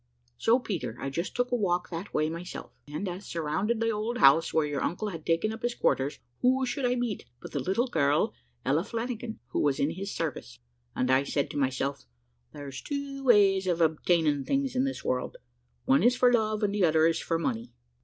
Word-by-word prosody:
"So, 230 Hz, +2 st, +4 dB
Peter, 150 Hz, -, -4 dB
I 135 Hz, -, -3 dB
just 170 Hz, +6 st, -3 dB
took 245 Hz, 0 st, 0 dB
a -, -, +3 dB
walk 185 Hz, -4 st, 0 dB
that 170 Hz, +4 st, -5 dB
way 155 Hz, -, +1 dB
myself, 170 Hz, +3 st, -6 dB, 0.2 s
and, 150 Hz, +7 st, -4 dB
as 180 Hz, 0 st, -3 dB
I -, -, -13 dB
surrounded 170 Hz, +8 st, -1 dB
the 230 Hz, 0 st, +1 dB
old 220 Hz, +3 st, -2 dB
house 150 Hz, -, +6 dB
where 160 Hz, -1 st, +2 dB
your 145 Hz, -2 st, -2 dB
uncle 210 Hz, +5 st, -2 dB
had 165 Hz, -5 st, -7 dB
taken 170 Hz, +7 st, +1 dB
up 220 Hz, -, -8 dB
his 240 Hz, 0 st, -1 dB
quarters, 135 Hz, +2 st, +1 dB, 0.2 s
who 260 Hz, +1 st, +3 dB
should 250 Hz, +1 st, -1 dB
I 245 Hz, -, +1 dB
meet 240 Hz, -4 st, -2 dB
but -, -, -10 dB
the 145 Hz, -, -2 dB
little 195 Hz, -, +1 dB
girl, 150 Hz, -, +1 dB, 0.3 s
Ella 150 Hz, +5 st, +2 dB
Flanagan, 230 Hz, +1 st, -4 dB
who -, -, -1 dB
was 145 Hz, -2 st, +1 dB
in 145 Hz, -, +1 dB
his 195 Hz, +4 st, -5 dB
service; 140 Hz, -, -4 dB, 0.4 s
and 130 Hz, +1 st, +1 dB
I 130 Hz, +1 st, +5 dB
said 140 Hz, 0 st, -1 dB
to -, -, -5 dB
myself, 135 Hz, -, -1 dB, 0.4 s
`There's 140 Hz, -2 st, -8 dB
two 280 Hz, -1 st, -4 dB
ways 200 Hz, -6 st, +5 dB
of 175 Hz, -2 st, +1 dB
obtaining 160 Hz, -2 st, +2 dB
things 275 Hz, -, -1 dB
in 255 Hz, +1 st, +2 dB
this 270 Hz, -, -4 dB
world, 125 Hz, 0 st, -1 dB, 0.5 s
one 135 Hz, -, +4 dB
is 245 Hz, +4 st, +4 dB
for 250 Hz, 0 st, +4 dB
love, 215 Hz, -2 st, +1 dB
and 200 Hz, -1 st, +1 dB
the 205 Hz, -2 st, +1 dB
other 160 Hz, -1 st, +4 dB
is 165 Hz, 0 st, +2 dB
for 165 Hz, -, -1 dB
money.' 115 Hz, -8 st, -3 dB
180 Hz, 215 wpm, -28 LUFS, 150-230 Hz, 0.5 s, house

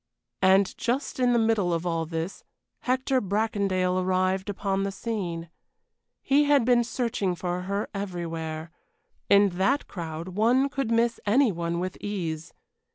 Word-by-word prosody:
And 190 Hz, 0 st, +4 dB
just 255 Hz, +3 st, -1 dB
in 250 Hz, -1 st, +3 dB
the 240 Hz, -, +3 dB
middle 220 Hz, -5 st, +2 dB
of 165 Hz, +1 st, -1 dB
all 165 Hz, -2 st, -1 dB
this, 165 Hz, +3 st, -4 dB, 0.4 s
Hector 260 Hz, +1 st, +1 dB
Bracondale 195 Hz, -3 st, 0 dB
arrived 185 Hz, +1 st, 0 dB
upon 195 Hz, -1 st, -1 dB
the 195 Hz, 0 st, -1 dB
scene. 180 Hz, -6 st, -4 dB, 0.7 s
He 285 Hz, +2 st, +4 dB
had 285 Hz, -4 st, +4 dB
been 240 Hz, -1 st, +4 dB
searching 230 Hz, -6 st, -1 dB
for 180 Hz, +1 st, -3 dB
her 200 Hz, +1 st, -1 dB
everywhere; 165 Hz, -4 st, -4 dB, 0.6 s
in 200 Hz, 0 st, +6 dB
that 270 Hz, +9 st, +2 dB
crowd 165 Hz, -1 st, -6 dB
one 235 Hz, +8 st, +2 dB
could 275 Hz, -4 st, -2 dB
miss 230 Hz, 0 st, +2 dB
any 240 Hz, +3 st, +4 dB
one 170 Hz, -1 st, -2 dB
with 185 Hz, +1 st, -4 dB
ease. 165 Hz, -6 st, -4 dB
195 Hz, 145 wpm, -26 LUFS, 175-230 Hz, 0.7 s, in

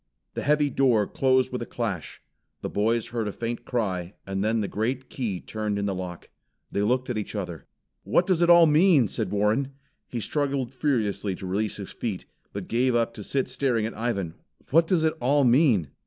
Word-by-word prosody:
The -, -, -3 dB
heavy 150 Hz, 0 st, +2 dB
door 120 Hz, -6 st, +3 dB
closed 130 Hz, +3 st, +2 dB
with 125 Hz, -, -3 dB
a -, -, -3 dB
clash. 105 Hz, -9 st, -4 dB, 0.4 s
The -, -, -4 dB
boys 115 Hz, +2 st, +1 dB
heard 115 Hz, -2 st, -2 dB
a -, -, -2 dB
faint 120 Hz, +3 st, -4 dB
cry, 95 Hz, -6 st, -2 dB
and 95 Hz, 0 st, -2 dB
then 110 Hz, +1 st, +1 dB
the 100 Hz, -, -1 dB
great 125 Hz, +6 st, -2 dB
key 110 Hz, -8 st, -3 dB
turned 105 Hz, 0 st, -3 dB
in 100 Hz, -, -1 dB
the 100 Hz, -, 0 dB
lock. 90 Hz, -2 st, -7 dB, 0.4 s
They 100 Hz, -, 0 dB
looked 125 Hz, +4 st, +1 dB
at 110 Hz, -, -1 dB
each 105 Hz, -, -6 dB
other. 90 Hz, -5 st, -5 dB, 0.4 s
"What 180 Hz, -, +2 dB
does 180 Hz, -3 st, +1 dB
it 170 Hz, -, +4 dB
all 170 Hz, -1 st, +8 dB
mean?" 155 Hz, -, +5 dB
said -, -, -2 dB
Warren. 110 Hz, +7 st, +1 dB, 0.3 s
He 120 Hz, -, -4 dB
struggled 135 Hz, 0 st, -1 dB
furiously 110 Hz, -8 st, 0 dB
to 95 Hz, -, -8 dB
release 100 Hz, +3 st, -1 dB
his 100 Hz, -2 st, -7 dB
feet, 105 Hz, -6 st, -4 dB, 0.3 s
but 100 Hz, -2 st, -6 dB
gave 125 Hz, +2 st, +1 dB
up 115 Hz, 0 st, +1 dB
to 105 Hz, -, -8 dB
sit 135 Hz, +6 st, 0 dB
staring 130 Hz, -3 st, 0 dB
at 115 Hz, -, -4 dB
Ivan. 105 Hz, -7 st, -2 dB, 0.4 s
"What 165 Hz, +3 st, +5 dB
does 170 Hz, -3 st, +2 dB
it 160 Hz, -, +2 dB
all 140 Hz, +3 st, +3 dB
mean?" 120 Hz, -, +4 dB
115 Hz, 200 wpm, -26 LUFS, 100-135 Hz, 0.4 s, all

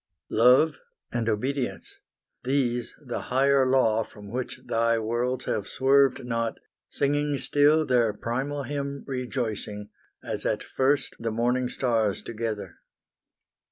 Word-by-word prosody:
Love 125 Hz, +7 st, +5 dB, 0.3 s
and 115 Hz, -1 st, -1 dB
Obedience 125 Hz, +4 st, -2 dB, 0.4 s
these 125 Hz, -2 st, 0 dB
the 120 Hz, -, -3 dB
Higher 135 Hz, +1 st, +4 dB
Law 115 Hz, -4 st, +3 dB
From 105 Hz, -2 st, -10 dB
which 125 Hz, +1 st, -4 dB
Thy 115 Hz, 0 st, +2 dB
worlds 120 Hz, +3 st, -1 dB
have 100 Hz, -, -2 dB
swerved 135 Hz, -1 st, +3 dB
not, 115 Hz, -1 st, -1 dB, 0.3 s
singing 145 Hz, 0 st, 0 dB
still 145 Hz, +4 st, +3 dB
Their 120 Hz, -5 st, +3 dB
primal 135 Hz, +7 st, -3 dB
hymn 140 Hz, 0 st, -4 dB
rejoicing, 120 Hz, -6 st, -4 dB, 0.3 s
as -, -, -4 dB
at -, -, -1 dB
first 135 Hz, +1 st, 0 dB
The 115 Hz, -, -2 dB
morning 125 Hz, +3 st, +1 dB
stars 115 Hz, -6 st, 0 dB
together. 110 Hz, -5 st, -4 dB
125 Hz, 120 wpm, -26 LUFS, 115-140 Hz, 0.4 s, Love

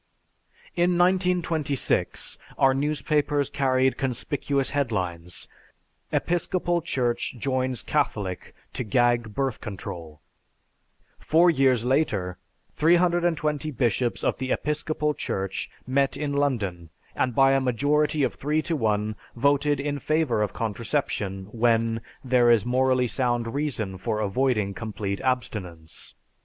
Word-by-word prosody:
In 175 Hz, 0 st, +2 dB
1926, 175 Hz, -5 st, +1 dB, 0.2 s
our 135 Hz, 0 st, +4 dB
newspapers 145 Hz, 0 st, 0 dB
carried 130 Hz, -1 st, +1 dB
conspicuous 135 Hz, +1 st, -1 dB
headlines, 90 Hz, -, -2 dB, 0.6 s
"Episcopal 175 Hz, 0 st, 0 dB
Church 125 Hz, -6 st, -1 dB
Joins 130 Hz, 0 st, -1 dB
Catholic 105 Hz, -11 st, -2 dB, 0.2 s
to -, -, -3 dB
Gag 120 Hz, -1 st, +1 dB
Birth 135 Hz, -4 st, -1 dB
Control"; 85 Hz, -6 st, -7 dB, 1.0 s
four 170 Hz, +3 st, +4 dB
years 130 Hz, -5 st, +2 dB
later, 105 Hz, -, 0 dB, 0.3 s
320 170 Hz, -2 st, +2 dB
bishops 120 Hz, -2 st, 0 dB
of -, -, 0 dB
the 130 Hz, -1 st, -2 dB
Episcopal 150 Hz, 0 st, -1 dB
Church 95 Hz, -8 st, -3 dB, 0.2 s
met 135 Hz, +1 st, +1 dB
in 145 Hz, -1 st, -2 dB
London, 105 Hz, -, -1 dB, 0.3 s
and 125 Hz, -3 st, 0 dB
by 135 Hz, 0 st, +5 dB
a 135 Hz, 0 st, +3 dB
majority 145 Hz, +4 st, +1 dB
of -, -, +1 dB
3 150 Hz, +2 st, -1 dB
to 170 Hz, -, -1 dB
1 105 Hz, -4 st, 0 dB, 0.2 s
voted 140 Hz, +3 st, +2 dB
in 145 Hz, 0 st, -2 dB
favor 155 Hz, -7 st, +1 dB
of 105 Hz, -3 st, 0 dB
contraception 110 Hz, -3 st, -2 dB
when 115 Hz, -1 st, +1 dB, 0.2 s
"there 125 Hz, -2 st, +4 dB
is 115 Hz, -4 st, +4 dB
morally 130 Hz, 0 st, +2 dB
sound 120 Hz, -2 st, -1 dB
reason 115 Hz, -10 st, -2 dB
for 105 Hz, +3 st, -2 dB
avoiding 105 Hz, -1 st, 0 dB
complete 100 Hz, -2 st, -4 dB
abstinence." 95 Hz, -10 st, -4 dB
130 Hz, 115 wpm, -25 LUFS, 110-150 Hz, 1.0 s, by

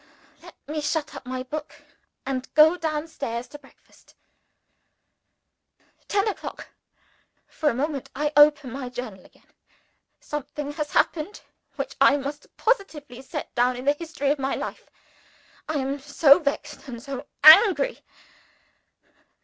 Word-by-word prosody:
Let -, -, -14 dB
me 305 Hz, +1 st, -3 dB
shut 300 Hz, +1 st, -2 dB
up 255 Hz, -, -10 dB
my 255 Hz, 0 st, -4 dB
book, 300 Hz, +4 st, -8 dB, 0.4 s
and 260 Hz, -1 st, -4 dB
go 310 Hz, +3 st, +7 dB
down 315 Hz, -2 st, -3 dB
stairs 245 Hz, -6 st, -5 dB
to 295 Hz, -, -11 dB
breakfast. 270 Hz, -, -23 dB, 1.9 s
Ten 400 Hz, +1 st, +1 dB
o'clock. 420 Hz, -, -6 dB, 0.8 s
For 305 Hz, -, -1 dB
a 235 Hz, -, -2 dB
moment, 280 Hz, +1 st, -3 dB
I 295 Hz, +2 st, -1 dB
open 295 Hz, -3 st, +5 dB
my 260 Hz, -1 st, -6 dB
Journal 235 Hz, -7 st, -7 dB
again. -, -, -23 dB, 0.7 s
Something 295 Hz, 0 st, -6 dB
has 300 Hz, 0 st, -5 dB
happened 335 Hz, +6 st, 0 dB, 0.3 s
which -, -, -5 dB
I 280 Hz, -, +6 dB
must 285 Hz, +1 st, -6 dB
positively 305 Hz, -, -1 dB
set 265 Hz, -, -7 dB
down 245 Hz, +1 st, +2 dB
in 250 Hz, +1 st, -7 dB
the 285 Hz, -, +4 dB
history 295 Hz, -3 st, -3 dB
of 295 Hz, -, -1 dB
my 270 Hz, 0 st, -1 dB
life. -, -, -7 dB, 0.8 s
I 315 Hz, -, -2 dB
am 275 Hz, 0 st, -2 dB
so 280 Hz, +1 st, +5 dB
vexed 290 Hz, -1 st, -4 dB
and 240 Hz, -3 st, -7 dB
so 275 Hz, +1 st, -7 dB, 0.2 s
angry! 395 Hz, +9 st, +7 dB
290 Hz, 135 wpm, -24 LUFS, 265-310 Hz, 1.9 s, go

